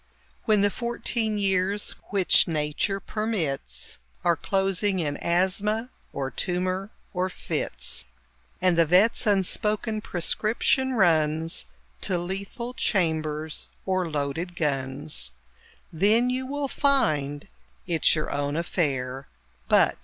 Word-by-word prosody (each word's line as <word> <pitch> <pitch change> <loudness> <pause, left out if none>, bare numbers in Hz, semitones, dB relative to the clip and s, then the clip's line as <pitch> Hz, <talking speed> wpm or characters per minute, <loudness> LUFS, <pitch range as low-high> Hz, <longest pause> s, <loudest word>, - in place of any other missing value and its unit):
When 215 -2 +4
the 205 0 +3
fourteen 235 -1 -1
years 195 0 +1 0.2
which 195 -3 +4
Nature 155 +5 -1
permits 160 - -3 0.2
Are 175 -1 +4
closing 195 +1 0
in 150 -5 -1
asthma, 200 +7 +1 0.2
or 135 -1 -3
tumour, 185 +2 -2 0.2
or 185 0 0
fits, - - -3 0.5
And 180 -2 +3
the 165 - +5
vet's 200 +8 +4
unspoken 210 +2 +1
prescription 220 +8 +1
runs 160 - +2 0.3
To 180 - 0
lethal 195 +7 -5
chambers 160 -8 -1 0.2
or 185 -2 0
loaded 150 +4 -3
guns, 140 - -1 0.6
Then 220 +9 +3
you 260 +1 -2
will 285 +1 -2
find 155 - +2 0.4
it's 165 -1 +3
your 155 - -2
own 145 0 -1
affair 135 -6 -1 0.4
But... - - +4
180 Hz, 110 wpm, -26 LUFS, 155-210 Hz, 0.6 s, the